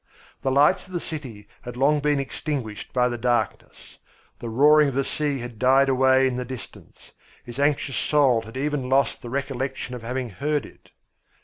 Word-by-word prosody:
The 135 - 0
lights 140 +6 +3
of 185 - -14
the 175 - -1
city 130 -12 -8
had 125 -1 -8
long 145 +3 +3
been 145 0 +1
extinguished 135 -5 -5
by 125 -1 +2
the 120 -1 -4
darkness. 120 -3 -2 0.4
The 120 - -6
roaring 150 +5 +5
of 130 - -6
the 140 - +1
sea 145 0 -2
had 120 -3 -8
died 135 +2 +4
away 130 0 +4
in 130 -1 0
the 125 - -2
distance; 125 -1 -11 0.3
his 120 +2 -9
anxious 140 -2 0
soul 135 -6 +3
had 115 +3 -10
even 140 -2 -2
lost 135 -2 +1
the 120 - -8
recollection 135 -1 -3
of 125 - -6
having 125 0 -4
heard 145 +9 -1
it. - - -17
130 Hz, 185 wpm, -24 LUFS, 120-145 Hz, 0.4 s, roaring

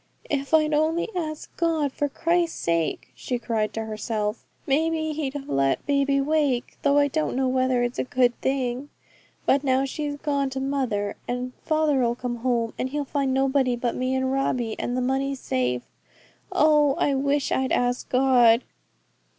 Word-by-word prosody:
'If 280 -1 -1
I'd 310 -1 +4
only 320 +5 +1
asked 310 -3 -5
God, 320 -4 +1
for 290 +1 -1
Christ's 335 +3 0
sake,' 170 -1 -1
she 250 - -3
cried 225 -3 -1
to 225 0 -3
herself, 215 0 -3 0.2
'maybe 315 +2 +1
He'd 290 -3 -3
have 280 -1 -6
let 135 0 +1
baby 280 -1 +2
wake, 275 -4 0
though 285 0 +3
I 285 0 +5
don't 310 0 -1
know 265 0 +1
whether 255 -1 +2
it's 245 0 -2
a - - +2
good 250 -1 +2
thing. 265 0 -1 0.6
But 280 +1 +3
now 265 0 +2
she's 290 +1 -3
gone 285 -2 -1
to 265 0 -4
mother, 260 -7 -1
and 250 +1 -3
father'll 290 -7 +1
come 245 -1 -4
home, 235 -2 0
and 255 - -1
he'll 290 +1 -2
find 275 -1 -1
nobody 265 -1 +2
but 240 0 -1
me 255 +1 -1
and 260 0 0
Robbie, 250 -4 0
and 245 - -2
the - - 0
money 270 +2 0
safe. 125 - -1 0.7
Oh! 300 -2 +4
I 285 - +1
wish 280 +1 0
I'd 260 0 0
asked 245 0 0
God.' 250 -2 +5
265 Hz, 170 wpm, -25 LUFS, 245-290 Hz, 0.7 s, I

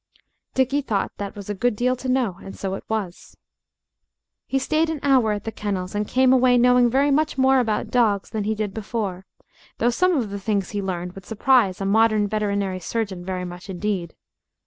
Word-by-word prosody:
Dickie 265 +2 +2
thought 210 -8 -1
that 200 -1 -5
was 200 -2 -9
a 205 - -2
good 240 +3 0
deal 250 +3 +1
to 255 +1 -5
know 245 -8 0
and 195 - -9
so 190 -1 -3
it 195 - -5
was. 205 -5 -4 1.1
He 270 - 0
stayed 310 +4 +1
an 320 -2 -3
hour 260 -6 +4
at 205 -1 -3
the 225 - -4
kennels 195 -4 -4
and 205 0 -1
came 260 0 +4
away 255 -1 +4
knowing 250 0 +5
very 275 +4 +2
much 300 0 +1
more 265 0 +4
about 220 -4 -1
dogs 215 -5 +2
than 215 -2 -2
he 220 +1 0
did 210 -2 -3
before, 200 -4 -4 0.5
though 240 +2 +2
some 365 +7 +2
of 225 -6 -2
the 200 - -4
things 200 -2 -1
he 205 -1 -2
learned 180 -2 -4
would 195 -2 -12
surprise 225 -3 +2
a 195 - -2
modern 215 +1 +3
veterinary 200 -3 -1
surgeon 195 -1 -3
very 180 0 -3
much 180 +2 -9
indeed. 185 -2 -3
215 Hz, 200 wpm, -23 LUFS, 195-250 Hz, 1.1 s, knowing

